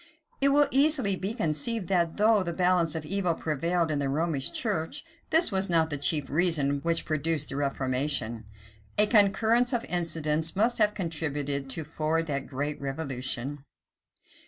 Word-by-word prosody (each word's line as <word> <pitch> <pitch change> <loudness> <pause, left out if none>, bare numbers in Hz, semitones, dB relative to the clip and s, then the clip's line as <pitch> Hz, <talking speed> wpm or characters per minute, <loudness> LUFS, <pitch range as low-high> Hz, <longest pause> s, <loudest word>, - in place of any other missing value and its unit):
It 275 - +4
will 290 +1 +4
easily 270 -8 +4
be 195 +4 -4
conceived 185 - 0
that, 170 -3 0
though 215 0 +4
the 170 -2 -3
balance 180 -2 +1
of 160 -1 -4
evil 180 -1 -1
prevailed 165 +2 -1
in 150 - -1
the 140 -1 -1
Romish 150 -1 -1
church, 200 - -2 0.2
this 325 -5 +4
was 190 0 +1
not 165 -2 +2
the 145 - -1
chief 145 -1 +1
reason 145 -3 +1
which 165 +2 -1
produced 155 -1 -1
the - - -4
reformation. 130 -4 -1 0.5
A 210 - +6
concurrence 225 +4 +3
of 235 -1 -1
incidents 160 -2 0
must 230 +5 +2
have 210 -1 +3
contributed 145 -6 -3
to 155 +5 -1
forward 160 +1 -2
that 140 -3 -4
great 145 +3 -4
revolution. 135 -1 -4
165 Hz, 160 wpm, -27 LUFS, 145-195 Hz, 0.5 s, A